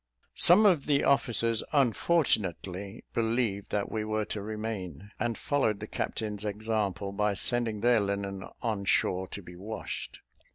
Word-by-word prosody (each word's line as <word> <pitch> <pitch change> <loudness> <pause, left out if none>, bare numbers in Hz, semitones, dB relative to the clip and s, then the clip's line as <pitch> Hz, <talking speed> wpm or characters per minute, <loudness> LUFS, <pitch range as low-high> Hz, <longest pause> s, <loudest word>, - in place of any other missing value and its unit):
Some 190 +6 +7
of 175 -9 +4
the 140 -2 +3
officers 115 -4 +3
unfortunately 110 - +1
believed 115 -3 0
that 100 -1 -1
we 110 -1 -1
were 110 0 -1
to 105 - -4
remain, 105 -4 -5
and 120 -2 -1
followed 110 -8 0
the - - -5
captain's 105 -2 -3
example 105 -2 -2
by 105 0 0
sending 115 -1 0
their 120 -1 +4
linen 100 -1 -2 0.2
on 105 -4 -1
shore 95 -1 +1
to 100 - -8
be 90 0 -11
washed. 105 +5 -6
105 Hz, 140 wpm, -29 LUFS, 100-115 Hz, 0.2 s, Some